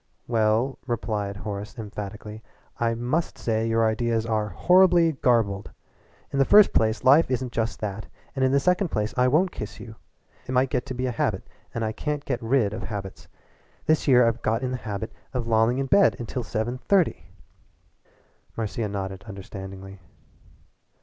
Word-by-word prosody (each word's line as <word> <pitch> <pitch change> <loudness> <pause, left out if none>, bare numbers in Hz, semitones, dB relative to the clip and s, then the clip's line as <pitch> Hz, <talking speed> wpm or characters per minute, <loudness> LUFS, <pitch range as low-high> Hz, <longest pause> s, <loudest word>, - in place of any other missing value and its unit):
"Well," 115 +3 +1
replied 105 -4 -2
Horace 105 +3 -6
emphatically, 105 0 -7 0.4
"I 115 -1 +1
must 125 +8 -2
say 115 -1 -1
your 115 0 +2
ideas 115 0 0
are 110 -2 -1
horribly 175 - +4
garbled! 115 -8 +1 0.6
In 140 - 0
the - - +6
first 205 +8 +6
place 110 +1 +1
life 140 +5 +6
isn't 130 -1 -2
just 115 -1 -2
that, 105 0 -4 0.3
and 135 - 0
in 130 - +3
the 140 - +4
second 180 +6 +2
place. 105 -3 -2
I 125 0 +3
won't 165 +8 +3
kiss 105 +1 -7
you. 110 0 -10 0.5
It 130 - -3
might 130 +1 +2
get 125 - -1
to 130 - -5
be 125 +1 -2
a 125 - 0
habit 115 - -2 0.2
and 115 -1 -2
I 110 - -1
can't 150 +5 -4
get 125 -3 -2
rid 115 -3 +1
of - - -5
habits. 100 -3 -7 0.6
This 155 -1 +2
year 125 -3 +6
I've 115 +1 -1
got 115 +3 0
in 130 - -1
the 130 - -2
habit 110 -1 -5 0.2
of 125 -2 -1
lolling 115 +2 +2
in 135 - 0
bed 195 +9 +4
until 120 +2 -4
seven 120 +2 -3
thirty 190 0 +1 0.7
" - - -37
Marcia 110 0 -2
nodded 95 -1 -5
understandingly. 95 -1 -9
115 Hz, 175 wpm, -25 LUFS, 105-130 Hz, 0.7 s, the